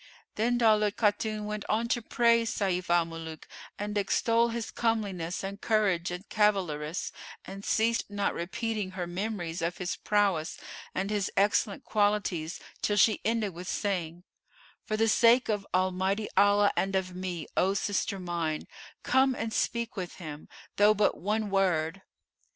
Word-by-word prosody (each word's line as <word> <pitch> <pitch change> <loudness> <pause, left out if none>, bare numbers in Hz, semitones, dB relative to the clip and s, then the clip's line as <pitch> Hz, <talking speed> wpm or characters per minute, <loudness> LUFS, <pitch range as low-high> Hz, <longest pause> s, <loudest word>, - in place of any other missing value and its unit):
Then 240 +3 +1
Daulat 215 -3 +3
Khatun 215 0 0
went 210 -1 -4
on 225 +2 +1
to 240 - +1
praise 230 0 +3
Sayf 185 -4 -1
al 175 -1 +4
Muluk 165 -1 -8 0.3
and 205 0 -4
extol 230 +4 +2
his 230 -1 -4
comeliness 200 -7 -1
and 200 +1 -5
courage 195 -6 +1
and 180 +3 -6
cavalarice, 180 -7 0 0.3
and 195 +1 -8
ceased 230 +1 +1
not 205 -1 -1
repeating 200 +2 -3
her 180 - -1
memories 175 -2 -3
of 170 +1 -2
his 180 -1 -2
prowess 200 -7 +1 0.4
and 195 +2 -1
his 205 -3 0
excellent 205 +1 +2
qualities 205 -6 0 0.2
till 205 - +1
she 215 +1 +4
ended 220 -3 0
with 175 +2 -8
saying, 175 -5 -2 0.6
"For 215 - -1
the 225 +1 +3
sake 235 +3 +5
of 205 -2 -1
Almighty 185 +3 0
Allah 205 +1 +5
and 195 0 0
of 185 -1 -1
me, 180 -4 -4
O 195 +2 +2
sister 200 0 -1
mine, 170 -3 -3 0.4
come 265 0 +3
and 225 -2 -3
speak 235 0 -1
with 185 -3 -5
him, 155 -4 -9 0.3
though 210 +1 +6
but 210 0 +2
one 210 +1 -1
word!" 185 -2 +1
200 Hz, 150 wpm, -29 LUFS, 180-215 Hz, 0.6 s, though